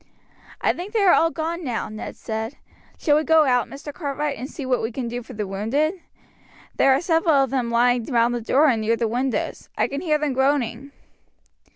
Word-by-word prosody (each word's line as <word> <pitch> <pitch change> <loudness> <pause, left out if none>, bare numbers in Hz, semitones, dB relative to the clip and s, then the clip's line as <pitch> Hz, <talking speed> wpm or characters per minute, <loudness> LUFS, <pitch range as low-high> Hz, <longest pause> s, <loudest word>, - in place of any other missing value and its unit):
"I - - +2
think 370 +5 -7
they 445 - +2
are 385 -3 +6
all 330 - +4
gone 330 +2 -4
now," 245 -6 -2
Ned 215 0 -7
said. 220 +3 -5 0.4
"Shall 295 -3 +3
we 310 - +1
go 320 -1 +5
out, 250 -3 +2
Mr. 285 +1 -8
Cartwright, 290 -2 -3
and 260 - -7
see 285 - -7
what 255 -1 +1
we 225 - -2
can 245 0 -4
do 240 +1 -4
for 250 - -11
the 210 -2 -3
wounded? 275 - -1 0.8
There 270 - +5
are 265 +2 +3
several 330 -2 +2
of 270 -2 +2
them 255 -3 0
lying 240 0 +2
round 235 -1 +2
the 240 - -2
door 275 +7 +3
and 235 -5 +2
near 225 +2 +2
the 230 0 -1
windows. 250 +3 -2
I - - +2
can 280 +1 -4
hear 310 -4 +2
them 300 -2 -1
groaning." 265 -1 0
265 Hz, 215 wpm, -23 LUFS, 235-305 Hz, 0.8 s, are